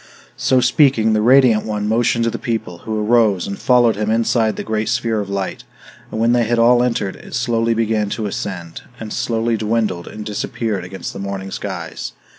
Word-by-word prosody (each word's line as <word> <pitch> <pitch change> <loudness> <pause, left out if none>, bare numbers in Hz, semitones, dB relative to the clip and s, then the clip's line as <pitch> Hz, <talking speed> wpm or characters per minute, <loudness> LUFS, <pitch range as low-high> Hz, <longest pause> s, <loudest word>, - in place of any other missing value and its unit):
So 130 -1 +2
speaking, 125 -3 +3
the 110 - +2
radiant 125 -2 +5
one 105 -1 -3
motioned 115 +1 +2
to 115 - +1
the - - -5
people, 110 -8 -3
who 110 +2 -3
arose, 110 -5 +3
and 100 - -5
followed 120 -4 +3
him 105 0 -1
inside 115 0 +1
the - - -5
great 110 0 -2
sphere 115 -2 0
of 100 -1 -4
light; 100 -1 -3 0.5
and 110 - -5
when 115 +1 +3
they 120 -1 +3
had 120 +2 0
all 120 +1 +5
entered, 115 -6 -1
it - - -9
slowly 115 -1 +1
began 110 -2 0
to 110 - -3
ascend, 90 -4 -5 0.2
and 110 -1 -6
slowly 115 0 0
dwindled 105 -5 -1
and 105 0 -8
disappeared 105 -1 -3
against 95 +1 -7
the - - -7
morning 100 -1 -5
skies. - - -5
110 Hz, 195 wpm, -19 LUFS, 105-115 Hz, 0.5 s, radiant